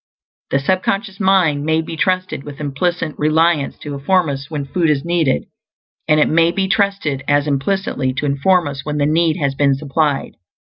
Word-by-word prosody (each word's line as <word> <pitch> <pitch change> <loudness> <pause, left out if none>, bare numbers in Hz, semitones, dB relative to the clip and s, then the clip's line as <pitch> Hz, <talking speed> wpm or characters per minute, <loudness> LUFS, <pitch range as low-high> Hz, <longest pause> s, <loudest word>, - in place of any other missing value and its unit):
The - - +2
sub 185 +7 0
conscious 200 0 -2
mind 185 -7 +2
may 160 +1 +1
be 160 0 -5
trusted 185 -4 -1
with 145 -1 -10
implicit 155 +3 -2
reliance 155 -1 +2
to 145 - -5
inform 160 +4 +1
us 135 -1 -5
when 150 -3 -4
food 165 +3 0
is 145 -1 0
needed; 165 - +1 0.6
and 155 0 +4
it - - +4
may 165 +1 +3
be 190 +1 -1
trusted 195 -9 0
as 145 0 +2
implicitly 140 -1 -1
to 135 - -3
inform 145 +5 +2
us 140 -1 -6
when 150 +1 -3
the 145 - +1
need 160 +1 +2
has 140 -2 0
been 140 0 +2
supplied. 145 0 -1
155 Hz, 185 wpm, -18 LUFS, 140-175 Hz, 0.6 s, and